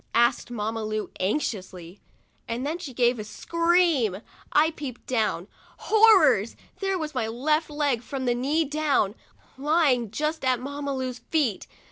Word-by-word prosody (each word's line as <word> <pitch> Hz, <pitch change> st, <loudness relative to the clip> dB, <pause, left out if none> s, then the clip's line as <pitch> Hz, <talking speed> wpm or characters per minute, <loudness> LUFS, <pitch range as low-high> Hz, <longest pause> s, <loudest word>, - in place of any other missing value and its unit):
asked 235 Hz, +1 st, +2 dB
Mamma 225 Hz, -1 st, -3 dB
Lu, 215 Hz, 0 st, -3 dB
anxiously, 185 Hz, -, -3 dB, 0.5 s
and 235 Hz, +3 st, -3 dB
then 320 Hz, +4 st, -2 dB
she 325 Hz, -7 st, -7 dB
gave 245 Hz, -1 st, +2 dB
a -, -, -3 dB
scream. 335 Hz, -, +1 dB, 0.3 s
I 315 Hz, +2 st, +4 dB
peeped 280 Hz, -6 st, -8 dB
down. 215 Hz, -7 st, -1 dB, 0.3 s
Horrors! 405 Hz, -, +5 dB, 0.2 s
there 390 Hz, -1 st, 0 dB
was 310 Hz, -3 st, -4 dB
my 240 Hz, -4 st, -1 dB
leg, 295 Hz, +1 st, 0 dB
from 265 Hz, +1 st, -5 dB
the 245 Hz, -, +2 dB
knee 285 Hz, +7 st, 0 dB
down, 290 Hz, -8 st, +1 dB, 0.5 s
lying 285 Hz, -6 st, +2 dB
just 305 Hz, +8 st, -2 dB
at 255 Hz, -2 st, +2 dB
Mamma 280 Hz, +1 st, -4 dB
Lu's 255 Hz, -1 st, -4 dB
feet. 280 Hz, -, 0 dB
260 Hz, 140 wpm, -25 LUFS, 230-310 Hz, 0.5 s, Horrors